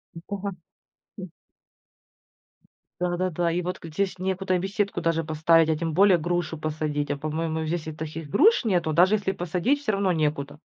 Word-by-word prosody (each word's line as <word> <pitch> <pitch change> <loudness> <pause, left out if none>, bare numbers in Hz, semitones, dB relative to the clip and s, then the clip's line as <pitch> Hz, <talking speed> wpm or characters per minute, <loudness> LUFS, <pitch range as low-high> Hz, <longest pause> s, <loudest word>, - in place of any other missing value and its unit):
Да, 200 +4 -5 0.7
м. 185 -2 -6 1.7
Да-да-да. 175 -1 0
И 175 +2 0
вот 180 +1 -4
г 165 - -9
здесь 185 +3 -2
некуда 190 0 -1
и - - +3
беседку 200 +2 -1
даже 165 -1 0
поставить, 160 +1 +3
а 160 - +2
тем 165 -1 -2
более 190 +1 +5
грушу 175 0 -2
посадить. 150 -1 -2
А 145 - -2
по-моему 160 +2 -2
здесь 160 0 -3
и 155 - -4
таких 155 0 -7
груш 390 - +4
нету, 175 -7 +1
даже 180 +6 +5
если 200 -2 -1
посадить, 185 - 0
всё 215 - -1
равно 195 -1 +1
некуда. 150 -3 -1
170 Hz, 170 wpm, -25 LUFS, 155-190 Hz, 1.7 s, более